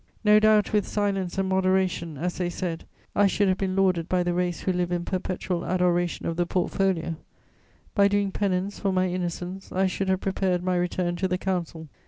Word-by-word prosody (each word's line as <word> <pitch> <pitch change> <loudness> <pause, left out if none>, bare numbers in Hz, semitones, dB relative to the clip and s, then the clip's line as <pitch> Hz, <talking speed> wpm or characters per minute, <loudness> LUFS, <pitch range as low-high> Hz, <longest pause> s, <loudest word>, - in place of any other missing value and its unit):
No 210 0 +6
doubt, 215 0 +4
with 210 -2 +2
silence 195 -4 -1
and 195 0 +1
moderation, 185 -4 +1
as 175 +5 -3
they 175 -1 0
said, 175 -2 -4 0.3
I 205 - +5
should 205 +1 +1
have 185 - +1
been 190 -1 -1
lauded 185 -3 +2
by 180 -1 +2
the 175 0 0
race 180 -1 -1
who 185 - 0
live 180 0 -1
in 175 -1 -1
perpetual 185 -1 -2
adoration 175 -1 0
of 165 - -2
the 175 -1 +1
portfolio; 180 -2 0 0.8
by 200 -1 +5
doing 200 -1 +1
penance 195 0 -1
for 195 - 0
my 185 0 +2
innocence, 180 +1 -4
I 190 +1 +1
should 190 +1 -1
have 190 -1 +2
prepared 185 -2 0
my 185 0 +1
return 175 0 -1
to 190 - 0
the 180 0 0
Council. 175 -4 -3
185 Hz, 200 wpm, -26 LUFS, 175-195 Hz, 0.8 s, No